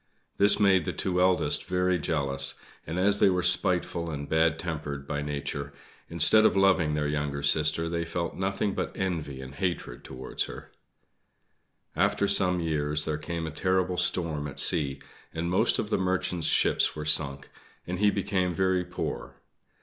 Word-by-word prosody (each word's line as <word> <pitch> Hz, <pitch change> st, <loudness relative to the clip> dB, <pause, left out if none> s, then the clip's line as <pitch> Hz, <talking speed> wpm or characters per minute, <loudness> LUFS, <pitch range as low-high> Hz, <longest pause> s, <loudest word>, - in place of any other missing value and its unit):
This 100 Hz, +1 st, +5 dB
made 95 Hz, -5 st, +4 dB
the -, -, -3 dB
two 90 Hz, -1 st, -1 dB
eldest 90 Hz, 0 st, +2 dB
very 90 Hz, 0 st, 0 dB
jealous; 70 Hz, -2 st, -1 dB, 0.3 s
and, 80 Hz, +3 st, -4 dB
as 100 Hz, +2 st, +4 dB
they -, -, +5 dB
were 90 Hz, -1 st, 0 dB
spiteful 90 Hz, -1 st, +1 dB
and 70 Hz, -2 st, -5 dB
bad 80 Hz, 0 st, +2 dB
tempered 75 Hz, -5 st, -5 dB
by 75 Hz, -1 st, -3 dB
nature, 70 Hz, -1 st, -4 dB, 0.4 s
instead 85 Hz, +6 st, +4 dB
of 110 Hz, -, +3 dB
loving 95 Hz, -6 st, +3 dB
their 75 Hz, -1 st, -1 dB
younger 75 Hz, -1 st, -3 dB
sister 75 Hz, +3 st, +2 dB
they 85 Hz, 0 st, -2 dB
felt 85 Hz, 0 st, -4 dB
nothing 95 Hz, +1 st, -1 dB
but -, -, -4 dB
envy 80 Hz, -8 st, -3 dB
and 65 Hz, +1 st, -9 dB
hatred 90 Hz, +2 st, -4 dB
towards 65 Hz, -1 st, -4 dB
her. -, -, -10 dB, 1.2 s
After 100 Hz, -, +1 dB
some 90 Hz, -2 st, +3 dB
years 75 Hz, -2 st, -1 dB
there 75 Hz, -1 st, -2 dB
came 85 Hz, +1 st, -4 dB
a 80 Hz, -, -5 dB
terrible 95 Hz, +2 st, 0 dB
storm 80 Hz, -6 st, -1 dB
at 70 Hz, -, -9 dB
sea, 70 Hz, -4 st, +2 dB, 0.4 s
and 85 Hz, +2 st, -2 dB
most 90 Hz, -, +3 dB
of 105 Hz, -, -3 dB
the -, -, +1 dB
Merchant's 90 Hz, -2 st, 0 dB
ships -, -, +3 dB
were 75 Hz, 0 st, -5 dB
sunk, 70 Hz, -3 st, +1 dB, 0.3 s
and 90 Hz, +1 st, -4 dB
he 105 Hz, 0 st, +4 dB
became 95 Hz, -3 st, -1 dB
very 95 Hz, -1 st, +1 dB
poor. 90 Hz, 0 st, -5 dB
85 Hz, 165 wpm, -27 LUFS, 75-95 Hz, 1.2 s, This